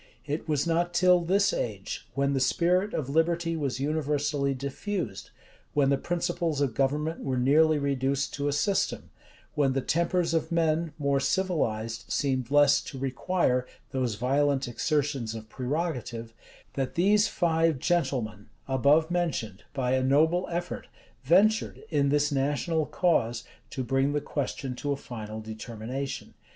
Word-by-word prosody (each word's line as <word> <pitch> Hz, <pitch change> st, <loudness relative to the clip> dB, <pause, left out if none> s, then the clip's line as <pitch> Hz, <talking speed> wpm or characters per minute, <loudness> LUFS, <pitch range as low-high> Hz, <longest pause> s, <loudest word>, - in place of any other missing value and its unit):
It 150 Hz, +3 st, -4 dB
was 150 Hz, -1 st, +1 dB
not 170 Hz, +1 st, 0 dB
till 180 Hz, 0 st, +5 dB
this 195 Hz, +4 st, +2 dB
age, 100 Hz, -4 st, -4 dB
when 140 Hz, 0 st, +1 dB
the 135 Hz, -, +1 dB
spirit 180 Hz, +9 st, +2 dB
of 140 Hz, -, -2 dB
liberty 165 Hz, +3 st, +1 dB
was 140 Hz, -5 st, -2 dB
universally 145 Hz, -1 st, 0 dB
diffused, 140 Hz, -, -4 dB, 0.5 s
when 140 Hz, -2 st, +3 dB
the 140 Hz, -, +3 dB
principles 175 Hz, -3 st, -1 dB
of 140 Hz, -5 st, +1 dB
government 150 Hz, +6 st, 0 dB
were 130 Hz, -1 st, -2 dB
nearly 150 Hz, +5 st, +4 dB
reduced 140 Hz, -1 st, 0 dB
to 145 Hz, 0 st, -2 dB
a -, -, +1 dB
system, 195 Hz, +7 st, 0 dB, 0.4 s
when 140 Hz, -3 st, +2 dB
the 135 Hz, -, 0 dB
tempers 170 Hz, +3 st, +1 dB
of 165 Hz, 0 st, 0 dB
men, 165 Hz, -1 st, +1 dB
more 140 Hz, -2 st, +1 dB
civilized, 115 Hz, -, -1 dB
seemed 130 Hz, -4 st, -1 dB
less 145 Hz, 0 st, +5 dB
to 135 Hz, -, -7 dB
require 130 Hz, 0 st, 0 dB, 0.2 s
those 125 Hz, -4 st, -1 dB
violent 135 Hz, +4 st, +1 dB
exertions 135 Hz, -2 st, -1 dB
of 110 Hz, 0 st, -9 dB
prerogative, 125 Hz, -5 st, -3 dB, 0.4 s
that 135 Hz, -2 st, -3 dB
these 205 Hz, +5 st, +4 dB
five 165 Hz, -5 st, +1 dB
gentlemen 130 Hz, -10 st, -1 dB, 0.2 s
above 140 Hz, +5 st, +3 dB
mentioned, 155 Hz, -, -2 dB
by 130 Hz, -3 st, -1 dB
a 130 Hz, 0 st, +2 dB
noble 160 Hz, +7 st, +3 dB
effort, 175 Hz, 0 st, -4 dB, 0.3 s
ventured, 195 Hz, -, +3 dB
in 140 Hz, -3 st, +2 dB
this 145 Hz, +1 st, +2 dB
national 145 Hz, +3 st, 0 dB
cause, 120 Hz, -10 st, +1 dB, 0.3 s
to 130 Hz, -, -4 dB
bring 135 Hz, +3 st, +1 dB
the 145 Hz, -, +1 dB
question 140 Hz, -2 st, -3 dB
to 145 Hz, -, -2 dB
a 140 Hz, -, 0 dB
final 110 Hz, -4 st, -7 dB
determination. 115 Hz, +4 st, -6 dB
145 Hz, 145 wpm, -28 LUFS, 130-165 Hz, 0.5 s, till